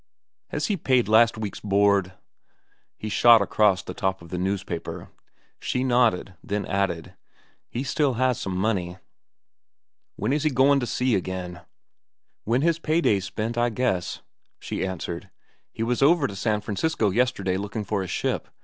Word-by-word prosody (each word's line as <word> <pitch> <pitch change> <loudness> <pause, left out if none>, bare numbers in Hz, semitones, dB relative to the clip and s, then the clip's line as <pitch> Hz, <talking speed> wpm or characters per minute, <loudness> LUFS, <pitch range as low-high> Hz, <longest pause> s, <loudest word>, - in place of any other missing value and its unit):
"Has 150 - -2
he 205 - 0
paid 130 - +2
last 110 +1 +5
week's 105 -3 -5
board?" 100 -2 +2 0.8
he 110 - -6
shot 115 +2 +6
across 100 -1 +2
the - - -7
top 95 -2 -2
of 85 - -13
the 90 - -3
newspaper. 95 -2 -4 0.5
She 125 - -1
nodded, 120 -7 +2
then 100 0 -2
added, 95 -4 -2 0.6
"He 120 - -3
still 140 -1 +1
has 130 0 +1
some 95 -1 -3
money." 95 -3 -1 1.2
"When 110 +7 -1
is 150 - +1
he 155 - +2
goin' 135 +1 +4
to 120 - -3
sea 125 +1 0
again?" 90 -2 -3 0.8
"When 120 +5 +1
his 165 0 +2
pay 160 0 +1
day's 100 - +2
spent, 110 +3 -3
I 120 0 +2
guess," 110 -6 -2 0.3
she - - -4
answered. 90 -2 -5 0.4
"He 115 - -4
was 120 +2 -1
over 150 +1 +5
to 100 - -4
San 105 +1 0
Francisco 105 +1 0
yesterday 100 -5 +1
looking 105 +2 -4
for 100 0 -1
a 95 - -4
ship. - - -2
105 Hz, 160 wpm, -25 LUFS, 95-125 Hz, 1.2 s, shot